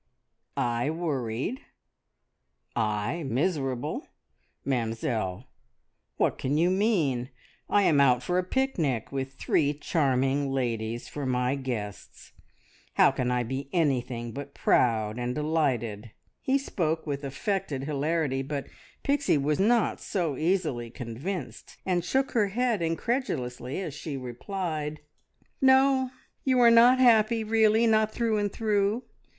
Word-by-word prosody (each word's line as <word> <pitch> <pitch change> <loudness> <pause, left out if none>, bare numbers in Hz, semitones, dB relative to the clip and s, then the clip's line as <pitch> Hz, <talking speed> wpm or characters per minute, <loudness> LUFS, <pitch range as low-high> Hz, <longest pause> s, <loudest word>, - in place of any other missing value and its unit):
"I 120 +3 0
worried! 150 - -2 1.1
I 105 +9 -1
miserable! 135 -2 -1 0.6
Mamzelle, 115 -4 -2 0.7
what - - +1
can 140 +3 0
you 175 +3 +3
mean? 165 - +1 0.4
I 205 - +4
am 150 -6 +4
out 125 -2 +4
for 180 +7 +1
a - - 0
picnic, 180 - -1
with 135 -1 -4
three 145 +1 +1
charming 140 -2 +1
ladies 120 -3 -2
for 145 -2 -5
my 125 0 +1
guests. 120 -7 -6 0.6
How - - +6
can 125 - -1
I 125 0 +1
be 135 +3 -4
anything 125 -8 0
but 140 +3 -8
proud 110 -2 +2
and 125 0 -2
delighted?" 130 -8 -1 0.3
He 265 +1 +2
spoke 165 - -2
with 145 -2 -3
affected 140 - -2
hilarity; 145 -1 0
but 140 0 -4 0.4
Pixie 280 - +2
was 145 +3 0
not 225 +3 +2
so 170 -7 -1
easily 155 -8 0
convinced, 125 - -6
and 180 -2 +1
shook 265 +9 0
her 215 -4 +2
head 230 0 0
incredulously 165 - -2
as 170 -7 -4
she 145 0 -5
replied 150 +4 -4 0.6
"No 265 0 +5 0.3
you 260 -2 +2
are 235 -1 +7
not 240 +2 +7
happy, 230 -2 +4
really 220 +1 +3
not 220 -1 +3
through 225 -2 0
and 205 -1 -1
through! 210 +2 0
150 Hz, 125 wpm, -27 LUFS, 125-205 Hz, 1.1 s, are